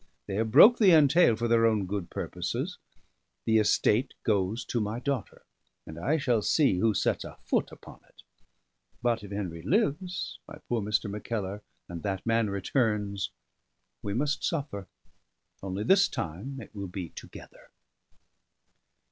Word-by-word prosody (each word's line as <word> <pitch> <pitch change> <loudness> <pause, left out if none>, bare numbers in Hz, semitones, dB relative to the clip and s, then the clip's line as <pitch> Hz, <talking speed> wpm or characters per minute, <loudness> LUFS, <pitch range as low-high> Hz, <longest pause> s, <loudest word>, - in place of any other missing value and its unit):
They - - -6
have 110 +1 0
broke 200 - +8
the 195 -6 +6
entail 150 -4 +5
for 115 +2 -1
their 115 0 +4
own 110 -3 +1
good 95 -2 -4
purposes; - - -4 0.7
the 110 0 +4
estate 110 +4 +2
goes 105 0 0
to 120 - -2
my 105 +2 -2
daughter; 135 -5 -4 0.4
and 80 +1 -9
I 145 - +1
shall 125 -6 +1
see 135 - +2
who 110 +1 +2
sets - - 0
a - - -10
foot - - 0
upon - - -13
it. - - -20 0.8
But 115 -2 +1
if 100 - -9
Henry 95 -5 -4
lives, 180 - -1
my - - -10
poor 120 -2 0
Mr. 105 +1 0
Mackellar, 105 -1 -4 0.3
and 85 -1 -7
that 95 -3 -3
man 115 -2 +2
returns, 100 - -1 0.7
we 100 0 -3
must 145 +4 -1
suffer: 140 - -3 0.7
only 95 +1 -3
this 195 - +5
time 100 - -5
it 110 - -11
will 100 -2 -5
be 90 -2 -6
together." - - -13
110 Hz, 150 wpm, -28 LUFS, 100-130 Hz, 0.8 s, broke